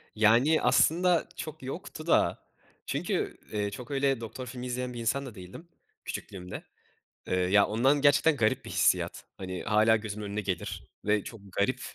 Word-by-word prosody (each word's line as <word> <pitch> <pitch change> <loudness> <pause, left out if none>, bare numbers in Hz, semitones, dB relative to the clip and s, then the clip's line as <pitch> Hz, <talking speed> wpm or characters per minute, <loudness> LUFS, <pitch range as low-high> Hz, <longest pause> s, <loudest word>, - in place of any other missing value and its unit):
Yani 115 +9 +4
aslında 175 +1 +3
çok 155 -2 -7
yoktu 155 +3 -7
da - - +2 0.4
çünkü, - - -2
eee, 105 -1 -1
çok 125 +4 -8
öyle 135 -3 +1
doktor 125 +3 -7
filmi 125 +1 -6
izleyen 125 0 -3
bir 120 - -6
insan 115 +5 0
da 120 -5 -9
değildim, 95 - -11 0.4
küçüklüğümde. 90 -2 -6 0.6
Eee, - - 0
ya, 95 +3 +4
ondan 135 +7 +2
gerçekten 145 +2 +5
garip 110 -5 +1
bir - - -7
hissiyat. - - +1
Hani, 95 -1 -5
hâlâ 110 +1 +4
gözümün 105 -1 -4
önüne 100 +1 -3
gelir 95 -3 -4 0.2
ve 105 -1 +2
çok 115 -3 -9
garip 125 +6 0
115 Hz, 160 wpm, -29 LUFS, 105-140 Hz, 0.6 s, gerçekten